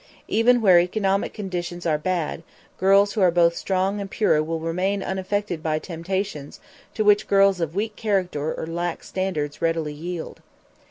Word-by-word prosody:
Even 240 Hz, +2 st, +3 dB
where 185 Hz, -5 st, +7 dB
economic 195 Hz, +2 st, 0 dB
conditions 175 Hz, -4 st, -5 dB
are 155 Hz, -2 st, +1 dB
bad, 170 Hz, -1 st, -2 dB, 0.4 s
girls 195 Hz, +2 st, +4 dB
who 215 Hz, -, -1 dB
are 185 Hz, -, +6 dB
both 170 Hz, 0 st, +3 dB
strong 195 Hz, +3 st, -1 dB
and 195 Hz, -, -6 dB
pure 190 Hz, -8 st, +2 dB
will 165 Hz, +1 st, -3 dB
remain 185 Hz, +5 st, -1 dB
unaffected 190 Hz, -2 st, -2 dB
by 155 Hz, -1 st, 0 dB
temptations 170 Hz, -2 st, -4 dB, 0.4 s
to 215 Hz, -, +1 dB
which 205 Hz, 0 st, +4 dB
girls 195 Hz, -2 st, +4 dB
of 165 Hz, 0 st, -2 dB
weak 210 Hz, +1 st, -2 dB
character 180 Hz, -8 st, -1 dB
or -, -, -4 dB
lax 170 Hz, +1 st, -4 dB
standards 160 Hz, -7 st, -3 dB
readily 165 Hz, -2 st, 0 dB
yield. 170 Hz, +2 st, -6 dB
185 Hz, 160 wpm, -23 LUFS, 165-200 Hz, 0.4 s, where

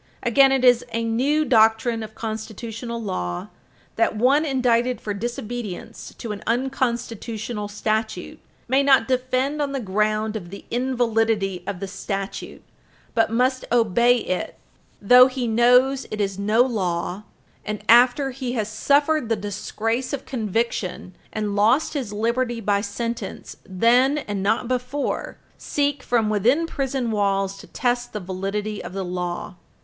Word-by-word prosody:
Again, 270 Hz, +3 st, +5 dB
it 265 Hz, -1 st, +2 dB
is 245 Hz, -1 st, +6 dB
a 230 Hz, 0 st, -1 dB
new 270 Hz, +7 st, +1 dB
doctrine 225 Hz, -1 st, +3 dB
of 220 Hz, 0 st, -8 dB
constitutional 225 Hz, +1 st, -5 dB
law 90 Hz, -, -4 dB, 0.5 s
that -, -, +2 dB
one 265 Hz, +8 st, +3 dB
indicted 250 Hz, -3 st, +1 dB
for 210 Hz, -, -4 dB
disobedience 230 Hz, 0 st, -6 dB
to 230 Hz, -, -5 dB
an 205 Hz, -, -6 dB
unconstitutional 235 Hz, -3 st, -2 dB
statute 215 Hz, +1 st, -3 dB, 0.3 s
may 265 Hz, +3 st, +3 dB
not 270 Hz, -4 st, +4 dB
defend 255 Hz, +3 st, 0 dB
on 280 Hz, -1 st, -1 dB
the 275 Hz, -, -1 dB
ground 215 Hz, +1 st, 0 dB
of 180 Hz, -5 st, -6 dB
the 200 Hz, -, -10 dB
invalidity 225 Hz, -6 st, 0 dB
of 200 Hz, -3 st, -4 dB
the 195 Hz, -, -4 dB
statute, 195 Hz, 0 st, -5 dB, 0.5 s
but 225 Hz, -, +2 dB
must 255 Hz, +3 st, +1 dB
obey 235 Hz, +1 st, +4 dB
it 185 Hz, -5 st, -3 dB, 0.4 s
though 250 Hz, +5 st, +7 dB
he 255 Hz, -2 st, -3 dB
knows 250 Hz, +4 st, +4 dB
it 215 Hz, -, -5 dB
is 195 Hz, -1 st, -1 dB
no 215 Hz, +4 st, +4 dB
law, 185 Hz, -6 st, -2 dB, 0.4 s
and, 210 Hz, -1 st, -5 dB
after 250 Hz, +4 st, +5 dB
he 255 Hz, -1 st, -4 dB
has 220 Hz, -4 st, -1 dB
suffered 285 Hz, +4 st, +2 dB
the 225 Hz, -, +2 dB
disgrace 220 Hz, +5 st, -3 dB
of 275 Hz, -, -4 dB
conviction 215 Hz, -6 st, -2 dB, 0.2 s
and 210 Hz, -2 st, -2 dB
lost 225 Hz, +11 st, +3 dB
his 265 Hz, -9 st, -3 dB
liberty 235 Hz, +3 st, -1 dB
by 205 Hz, -2 st, +1 dB
sentence, 230 Hz, 0 st, -5 dB
then, 245 Hz, +9 st, +3 dB
and 205 Hz, -9 st, -3 dB
not 220 Hz, +4 st, +1 dB
before, 255 Hz, +3 st, -2 dB, 0.2 s
seek, 285 Hz, -1 st, -1 dB
from 230 Hz, -3 st, +1 dB
within 230 Hz, -, +2 dB
prison 270 Hz, -6 st, -2 dB
walls, 195 Hz, -2 st, 0 dB
to -, -, -12 dB
test 245 Hz, -1 st, -1 dB
the 210 Hz, -, -3 dB
validity 195 Hz, +3 st, -4 dB
of -, -, -8 dB
the 195 Hz, -1 st, -3 dB
law. 180 Hz, 0 st, -4 dB
230 Hz, 145 wpm, -23 LUFS, 205-255 Hz, 0.5 s, though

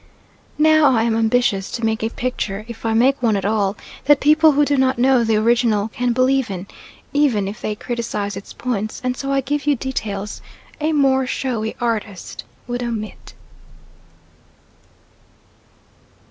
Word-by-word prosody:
Now 310 Hz, -3 st, +5 dB
I 225 Hz, -, +2 dB
am 230 Hz, -1 st, +1 dB
ambitious 225 Hz, -3 st, +1 dB
to 230 Hz, -, -2 dB
make 220 Hz, 0 st, 0 dB
a 225 Hz, -, 0 dB
picture, 215 Hz, -5 st, -3 dB
if 230 Hz, -1 st, -6 dB
I 225 Hz, -, +1 dB
make 260 Hz, +4 st, +3 dB
one 225 Hz, -3 st, +2 dB
at 195 Hz, -1 st, -2 dB
all, 205 Hz, -1 st, 0 dB, 0.3 s
that 290 Hz, 0 st, +5 dB
people 310 Hz, +1 st, +5 dB
who 290 Hz, +1 st, +3 dB
do 285 Hz, -, +1 dB
know 260 Hz, -1 st, +3 dB
the 225 Hz, -1 st, +1 dB
original 225 Hz, -1 st, +2 dB
can 245 Hz, +2 st, -1 dB
believe 255 Hz, 0 st, +2 dB
in 185 Hz, -1 st, -5 dB, 0.5 s
even 260 Hz, -9 st, +2 dB
if 205 Hz, +2 st, -7 dB
they 210 Hz, -, -2 dB
criticise 230 Hz, -4 st, -3 dB
its 195 Hz, -, -9 dB
points 215 Hz, -4 st, -3 dB
and 250 Hz, 0 st, -1 dB
so 275 Hz, +1 st, -4 dB
I 275 Hz, 0 st, +2 dB
give 290 Hz, +2 st, -3 dB
you 290 Hz, -, +4 dB
details 210 Hz, -6 st, -4 dB, 0.4 s
a 310 Hz, +1 st, 0 dB
more 265 Hz, -3 st, +2 dB
showy 235 Hz, -5 st, -2 dB
artist 220 Hz, -5 st, -4 dB, 0.2 s
would 245 Hz, 0 st, -4 dB
omit. 225 Hz, -3 st, -6 dB
240 Hz, 155 wpm, -20 LUFS, 215-265 Hz, 0.5 s, Now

